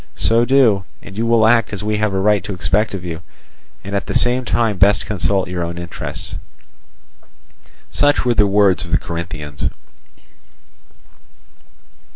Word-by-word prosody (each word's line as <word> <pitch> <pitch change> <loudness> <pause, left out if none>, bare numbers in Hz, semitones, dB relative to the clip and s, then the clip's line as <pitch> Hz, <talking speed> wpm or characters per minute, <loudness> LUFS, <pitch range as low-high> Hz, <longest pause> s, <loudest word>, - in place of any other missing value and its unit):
So 115 +1 +3
do, 120 -7 +3 0.2
and 95 - -11
you 115 +2 -1
will 115 -1 +4
act 115 -1 +3
as 105 -1 -5
we 105 0 -1
have 105 -1 0
a 95 - -1
right 105 -1 +2
to 100 - -4
expect 100 +4 0
of 90 -2 -7
you, 85 -1 -6 0.6
and 100 +2 -5
at 100 - -2
the - - -3
same 125 +1 +3
time 110 -5 0
best 100 0 +4
consult 95 -2 0
your 90 -1 -4
own 85 0 -4
interests." 85 -1 -6 1.5
Such 145 -3 +2
were 120 - +3
the 105 -3 +3
words 100 -2 +3
of 85 - -9
the 85 - +3
Corinthians. 85 -4 -5
100 Hz, 160 wpm, -18 LUFS, 90-110 Hz, 1.5 s, will